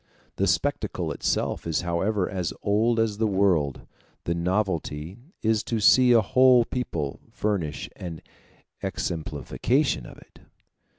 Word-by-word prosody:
The -, -, +1 dB
spectacle -, -, -1 dB
itself -, -, -1 dB
is 80 Hz, 0 st, 0 dB
however 90 Hz, +3 st, 0 dB
as 90 Hz, -3 st, -3 dB
old 110 Hz, +3 st, +2 dB
as 110 Hz, -2 st, 0 dB
the 110 Hz, -, +2 dB
world; 95 Hz, -9 st, +1 dB, 0.4 s
the 85 Hz, -, -1 dB
novelty 85 Hz, -1 st, -2 dB, 0.2 s
is 110 Hz, -1 st, +2 dB
to 115 Hz, -, -1 dB
see 125 Hz, +4 st, +6 dB
a 115 Hz, -2 st, +6 dB
whole 125 Hz, +3 st, +5 dB
people 85 Hz, -, -3 dB
furnish 90 Hz, -9 st, -2 dB
an 85 Hz, -3 st, -7 dB, 0.6 s
exemplification 85 Hz, -, -1 dB
of -, -, -12 dB
it. -, -, -19 dB
100 Hz, 125 wpm, -25 LUFS, 85-115 Hz, 0.6 s, see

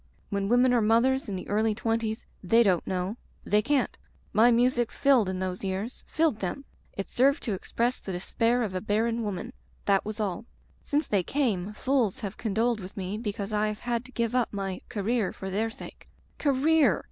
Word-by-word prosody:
When 200 Hz, 0 st, -1 dB
women 245 Hz, +1 st, +4 dB
are 240 Hz, -, +4 dB
mothers 235 Hz, +4 st, +3 dB
in 195 Hz, -, -2 dB
the 185 Hz, -, -6 dB
early 215 Hz, +1 st, +1 dB
twenties 225 Hz, -1 st, -1 dB, 0.2 s
they 225 Hz, +6 st, +5 dB
don't 185 Hz, -6 st, +2 dB
know. 185 Hz, +4 st, -2 dB, 0.3 s
They 210 Hz, +1 st, +3 dB
can't. 280 Hz, +4 st, 0 dB, 0.3 s
My 225 Hz, +3 st, +6 dB
music 240 Hz, 0 st, +3 dB
filled 265 Hz, -8 st, +3 dB
in 190 Hz, -, -2 dB
those 185 Hz, 0 st, -3 dB
years. 195 Hz, +6 st, -3 dB
Filled 315 Hz, -9 st, +1 dB
them! 235 Hz, +9 st, -4 dB, 0.3 s
It 195 Hz, -, -4 dB
served 275 Hz, +4 st, +2 dB
to 220 Hz, -, -1 dB
express 235 Hz, +6 st, -1 dB
the 195 Hz, -, -6 dB
despair 230 Hz, +7 st, +1 dB
of 205 Hz, -4 st, -3 dB
a 185 Hz, -, -2 dB
barren 225 Hz, +2 st, 0 dB
woman 215 Hz, +3 st, -4 dB, 0.2 s
— -, -, -34 dB
that 195 Hz, -1 st, +3 dB
was 215 Hz, +1 st, -5 dB
all. 205 Hz, 0 st, -2 dB, 0.4 s
Since 295 Hz, +2 st, 0 dB
they 200 Hz, -3 st, +1 dB
came 210 Hz, -4 st, -1 dB
fools 255 Hz, -1 st, 0 dB
have 205 Hz, -1 st, -4 dB
condoled 225 Hz, +2 st, 0 dB
with 190 Hz, +1 st, -9 dB
me 190 Hz, +1 st, -3 dB
because 205 Hz, -2 st, -4 dB
I 210 Hz, 0 st, +2 dB
have 215 Hz, 0 st, -4 dB
had 240 Hz, -1 st, -1 dB
to 260 Hz, -, -12 dB
give 235 Hz, -2 st, -1 dB
up 250 Hz, -2 st, +1 dB
my 195 Hz, -2 st, -4 dB
'career' 220 Hz, -1 st, 0 dB
for 190 Hz, 0 st, -6 dB
their 220 Hz, +4 st, 0 dB
sake. -, -, -11 dB, 0.3 s
Career!" 280 Hz, -, +3 dB
220 Hz, 195 wpm, -28 LUFS, 195-245 Hz, 0.4 s, My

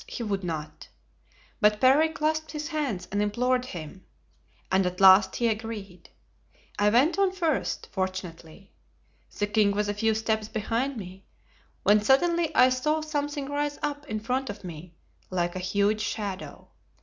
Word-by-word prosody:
he 240 Hz, -, -5 dB
would 200 Hz, -3 st, -2 dB
not. 155 Hz, -3 st, -6 dB, 0.7 s
But 210 Hz, -2 st, +3 dB
Parry 275 Hz, +6 st, +5 dB
clasped 315 Hz, -1 st, -2 dB
his 300 Hz, +1 st, -4 dB
hands 275 Hz, -, -3 dB
and 205 Hz, +1 st, 0 dB
implored 250 Hz, +4 st, +1 dB
him, 180 Hz, -, -8 dB, 0.7 s
and 190 Hz, 0 st, +3 dB
at 180 Hz, 0 st, -5 dB
last 190 Hz, 0 st, +7 dB
he 235 Hz, -, +1 dB
agreed. 210 Hz, -5 st, -5 dB, 0.7 s
I 205 Hz, 0 st, +4 dB
went 265 Hz, -, +3 dB
on 390 Hz, -1 st, +3 dB
first, 335 Hz, -6 st, -1 dB
fortunately. 185 Hz, -1 st, -5 dB, 0.7 s
The 205 Hz, -, +1 dB
king 210 Hz, 0 st, +2 dB
was 210 Hz, 0 st, 0 dB
a -, -, 0 dB
few 220 Hz, +1 st, +1 dB
steps 220 Hz, -1 st, -1 dB
behind 230 Hz, +5 st, -2 dB
me, 190 Hz, -1 st, -10 dB, 0.6 s
when 210 Hz, +1 st, +5 dB
suddenly 335 Hz, +8 st, +3 dB
I 255 Hz, -, +7 dB
saw 300 Hz, +5 st, 0 dB
something 290 Hz, -2 st, -3 dB
rise 290 Hz, 0 st, -2 dB
up 295 Hz, 0 st, -3 dB
in 215 Hz, -4 st, -3 dB
front 255 Hz, +4 st, -2 dB
of 205 Hz, 0 st, -7 dB
me 170 Hz, -1 st, -9 dB, 0.3 s
like 175 Hz, -1 st, -1 dB
a -, -, -3 dB
huge 200 Hz, +3 st, +1 dB
shadow. 200 Hz, -3 st, -5 dB
215 Hz, 155 wpm, -27 LUFS, 195-285 Hz, 0.7 s, last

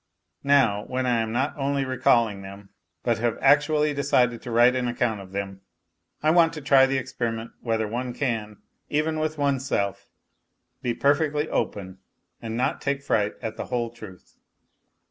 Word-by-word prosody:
Now, 135 Hz, -8 st, +3 dB
when 130 Hz, 0 st, -2 dB
I 120 Hz, -2 st, +2 dB
am 110 Hz, -1 st, -2 dB
not 130 Hz, +5 st, -1 dB
only 140 Hz, -1 st, -1 dB
recalling 115 Hz, -5 st, +2 dB
them, 100 Hz, +1 st, -11 dB, 0.3 s
but 115 Hz, -3 st, +1 dB
have 120 Hz, 0 st, 0 dB
actually 150 Hz, +2 st, +3 dB
decided 125 Hz, -4 st, +1 dB
to -, -, -8 dB
write 120 Hz, +2 st, +5 dB
an 125 Hz, -1 st, -1 dB
account 120 Hz, -3 st, -1 dB
of 95 Hz, -1 st, -12 dB
them, 95 Hz, -1 st, -5 dB, 0.6 s
I 155 Hz, -, +4 dB
want 165 Hz, -1 st, +4 dB
to 155 Hz, -, -7 dB
try 135 Hz, -2 st, +5 dB
the 135 Hz, 0 st, 0 dB
experiment 115 Hz, -3 st, -4 dB
whether 115 Hz, -2 st, -1 dB
one 125 Hz, +3 st, -3 dB
can, 115 Hz, -5 st, -3 dB, 0.3 s
even 155 Hz, +1 st, 0 dB
with 155 Hz, 0 st, -2 dB
oneself, 130 Hz, -9 st, -1 dB, 0.7 s
be 120 Hz, -1 st, -1 dB
perfectly 150 Hz, +3 st, +1 dB
open 95 Hz, -2 st, -3 dB, 0.4 s
and 115 Hz, 0 st, -4 dB
not 125 Hz, -, -1 dB
take 140 Hz, 0 st, -2 dB
fright 105 Hz, -6 st, 0 dB
at 110 Hz, -, -4 dB
the -, -, -4 dB
whole 120 Hz, -2 st, -2 dB
truth. 110 Hz, -6 st, -13 dB
125 Hz, 165 wpm, -25 LUFS, 110-140 Hz, 0.7 s, write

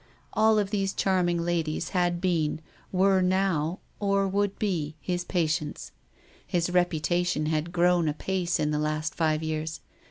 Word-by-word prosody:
All 220 Hz, 0 st, +4 dB
of 205 Hz, -1 st, 0 dB
these 195 Hz, -2 st, -1 dB
charm 185 Hz, -2 st, +2 dB
ing 170 Hz, -1 st, 0 dB
ladies 165 Hz, -3 st, -1 dB
had 175 Hz, -2 st, +1 dB
been, 165 Hz, -5 st, 0 dB, 0.3 s
were 190 Hz, 0 st, +3 dB
now, 185 Hz, -2 st, +1 dB, 0.2 s
or 200 Hz, -1 st, +2 dB
would 200 Hz, +1 st, 0 dB
be, 165 Hz, -8 st, -1 dB
his 180 Hz, +1 st, -2 dB
patients. 155 Hz, -4 st, -2 dB, 0.6 s
His 175 Hz, 0 st, 0 dB
reputation 175 Hz, -2 st, +1 dB
had 155 Hz, +2 st, -1 dB
grown 175 Hz, -1 st, +3 dB
apace 180 Hz, +3 st, -1 dB
in 150 Hz, -, +1 dB
the 150 Hz, -, 0 dB
last 155 Hz, +1 st, -1 dB
five 155 Hz, -1 st, 0 dB
years. 155 Hz, 0 st, -3 dB
175 Hz, 150 wpm, -27 LUFS, 155-190 Hz, 0.6 s, All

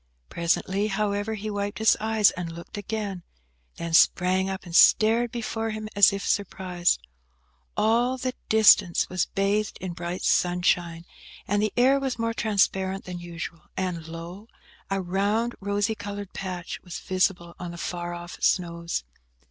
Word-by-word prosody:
Presently, 190 Hz, +4 st, 0 dB
however, 210 Hz, +1 st, -1 dB
he 215 Hz, +1 st, -5 dB
wiped 205 Hz, 0 st, -3 dB
his 220 Hz, 0 st, +4 dB
eyes, 220 Hz, -1 st, +3 dB
and 175 Hz, -2 st, -5 dB
looked 170 Hz, +4 st, -10 dB
again; 205 Hz, -2 st, -4 dB, 0.5 s
then 170 Hz, -1 st, -5 dB
sprang 185 Hz, +3 st, +4 dB
up 190 Hz, 0 st, -4 dB
and 170 Hz, -1 st, -7 dB
stared 225 Hz, +5 st, +5 dB
before 225 Hz, -1 st, -3 dB
him 215 Hz, 0 st, -5 dB
as 200 Hz, 0 st, +7 dB
if 200 Hz, 0 st, -4 dB
surprised. 180 Hz, -3 st, 0 dB, 0.8 s
All 240 Hz, +4 st, +2 dB
the 255 Hz, 0 st, -2 dB, 0.2 s
distance 205 Hz, -5 st, +5 dB
was 185 Hz, -1 st, 0 dB
bathed 200 Hz, +2 st, 0 dB
in 185 Hz, -2 st, -5 dB
bright 175 Hz, +1 st, -5 dB
sunshine, 175 Hz, -1 st, +1 dB, 0.4 s
and 205 Hz, +1 st, +1 dB
the 215 Hz, -1 st, +1 dB
air 265 Hz, +3 st, +5 dB
was 265 Hz, -3 st, -2 dB
more 230 Hz, 0 st, -1 dB
transparent 195 Hz, -3 st, 0 dB
than 180 Hz, -1 st, -6 dB
usual, 170 Hz, -1 st, -7 dB, 0.2 s
and, 175 Hz, -4 st, -3 dB
lo! 170 Hz, +6 st, -8 dB, 0.4 s
a 195 Hz, 0 st, 0 dB
round 200 Hz, +6 st, 0 dB
rosy 205 Hz, +2 st, 0 dB
coloured 205 Hz, -2 st, -7 dB
patch 185 Hz, -2 st, -5 dB
was 180 Hz, -2 st, -7 dB
visible 185 Hz, -2 st, 0 dB
on 175 Hz, -, -5 dB
the 170 Hz, -, -8 dB
far 175 Hz, 0 st, -4 dB
off 175 Hz, 0 st, -9 dB
snows. 170 Hz, -, 0 dB
195 Hz, 150 wpm, -26 LUFS, 175-215 Hz, 0.8 s, as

